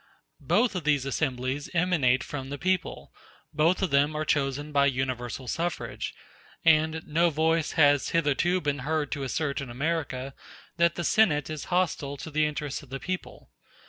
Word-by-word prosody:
Both 245 -3 +2
of 180 -3 -3
these 145 -3 +2
assemblies 135 0 -2
emanate 165 -8 +2
from 135 -2 -6
the 145 - -4
people; 185 +3 -2 0.4
both 165 +6 +2
of 190 - 0
them 145 +2 +3
are 155 0 -1
chosen 145 +1 0
by 140 -1 +4
universal 130 -1 -3
suffrage; 170 +6 -3 0.5
and 160 0 +3
no 170 +3 +2
voice 160 +1 +1
has 145 -3 +4
hitherto 165 +3 +1
been 145 -2 -1
heard 150 +2 -1
to 145 - -3
assert 140 +1 -2
in 135 - -6
America 135 -1 -2 0.4
that 170 0 +3
the 175 - -3
Senate 155 -7 +3
is 155 -2 -5
hostile 160 -6 -1
to 160 - -8
the 155 +1 +2
interests 150 -2 -4
of 140 - -16
the 135 +1 -5
people. 185 +7 -6
150 Hz, 165 wpm, -27 LUFS, 140-165 Hz, 0.5 s, by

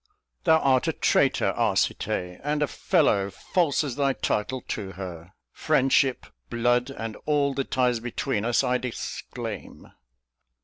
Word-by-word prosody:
Thou 160 -2 +6
art 130 -4 +2
a - - +1
traitor, - - +2
Arcite, 90 0 0
and 150 +1 0
a - - +1
fellow 115 - +2
False 155 - 0
as 140 -4 -4
thy 140 -1 +2
title 125 +2 -1
to 95 -3 -4
her. 90 -1 -8 0.2
Friendship, 135 0 +2 0.2
blood, 120 +2 +1
And 115 -5 -6
all 145 -2 +2
the 135 0 -1
ties 125 -2 +1
between 120 -1 -2
us, 120 +3 +2
I 125 -1 +1
disclaim. 125 -2 -6
125 Hz, 135 wpm, -26 LUFS, 110-140 Hz, 0.2 s, Thou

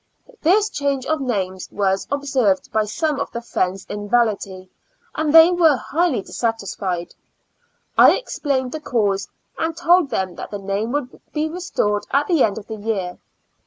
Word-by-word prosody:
This 400 +6 +4
change 280 -2 -1
of 315 -2 0
names 190 -7 -2
was 195 -1 0
observed 265 -9 0
by 215 0 +1
some 295 +6 -1
of 280 - -2
the 235 - -5
friends 195 -5 -2
in 205 0 -6
Valatie, 200 -5 0 0.5
and 305 -1 0
they 325 +2 +8
were 335 -4 +4
highly 295 - 0
dissatisfied. 195 -7 -3 0.9
I - - +8
explained 275 - -2
the 310 - -4
cause, 205 -8 0 0.3
and 325 0 -1
told 350 -2 +4
them 190 -5 -2
that - - -7
the 205 - -4
name 200 +3 -2
would 285 -3 -4
be 305 0 0
restored 310 - -1
at 280 +2 +2
the 325 -4 +3
end 205 -3 +1
of 215 - -7
the 220 -1 -7
year. 205 -4 -3
240 Hz, 160 wpm, -21 LUFS, 200-300 Hz, 0.9 s, they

